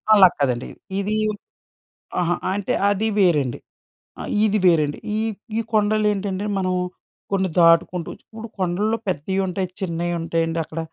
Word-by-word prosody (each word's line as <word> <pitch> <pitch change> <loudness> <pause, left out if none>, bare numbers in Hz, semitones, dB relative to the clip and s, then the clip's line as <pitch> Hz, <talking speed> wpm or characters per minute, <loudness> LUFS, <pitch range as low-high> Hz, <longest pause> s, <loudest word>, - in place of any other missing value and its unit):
అలాకాదండి. 145 - +4 0.3
ఇది 210 +2 0 1.0
అహా! 175 0 +1 0.2
అంటే 200 0 -1 0.2
అది 205 +2 0
వేరండి. 150 -10 +2 0.6
ఆ - - -5 0.2
ఇది 215 0 +2
వేరండి. 155 -4 +3 0.2
ఈ - - 0 0.4
ఈ - - +2
కొండలు 215 0 +2
ఏంటంటే, 200 0 -3
మనం 185 -1 0 0.6
కొన్ని 190 -2 +1
దాటుకుంటూ 165 +1 +4
ఇప్పుడు 225 +1 -10
కొండల్లో 200 +5 0
పెద్దయి 185 +2 -1
ఉంటాయి, 185 0 -2
చిన్నయి 175 -2 -2
ఉంటాయండి 165 0 -1
అక్కడ. 160 +1 -7
185 Hz, 125 wpm, -22 LUFS, 165-200 Hz, 1.0 s, అలాకాదండి